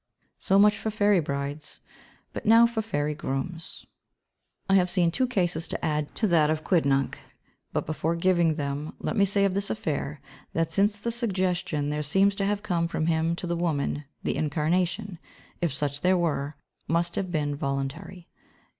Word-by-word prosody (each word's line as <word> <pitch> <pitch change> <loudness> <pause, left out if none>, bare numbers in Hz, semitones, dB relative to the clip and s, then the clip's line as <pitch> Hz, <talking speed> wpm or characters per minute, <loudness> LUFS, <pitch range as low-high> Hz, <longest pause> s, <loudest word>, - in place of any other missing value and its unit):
So 195 - +3
much 210 +1 +5
for 220 - -2
fairy 205 -2 +3
brides, 145 0 -4 0.5
but - - -5
now 230 +1 +8
for 235 -1 -1
fairy 150 -9 -1
grooms. 150 +3 -4 0.8
I 195 - +2
have 180 -2 +4
two 180 +7 +2
cases 175 -8 0
to - - -3
add 150 -2 -1
to 225 - +1
that 165 -6 +4
of 155 0 -1
Quidnunc, 140 -7 +1 0.5
but - - -1
before 160 +2 -1
giving 170 -2 +2
them, 145 0 -4
let - - -3
me 200 -2 +4
say 200 0 +2
of 195 - +1
his 200 +1 0
affair 150 -6 -3 0.3
that 165 -1 0
since 205 +1 +2
the 235 +3 -2
suggestion 185 - 0
there 150 0 -1
seems 195 +7 +3
to 195 - 0
have 205 +1 -1
come 175 -5 0
from 160 -1 -2
him 165 0 +1
to 175 - -5
the 170 0 -1
woman, 150 -3 -1 0.2
the - - -1
incarnation, 170 +5 0 0.4
if 170 -3 +1
such 145 +1 -2
there 185 0 +3
were, 150 -4 -1 0.3
must 170 +2 +1
have 185 -2 -2
been 145 -3 -1
voluntary. 140 +6 -4
170 Hz, 170 wpm, -27 LUFS, 150-195 Hz, 0.8 s, now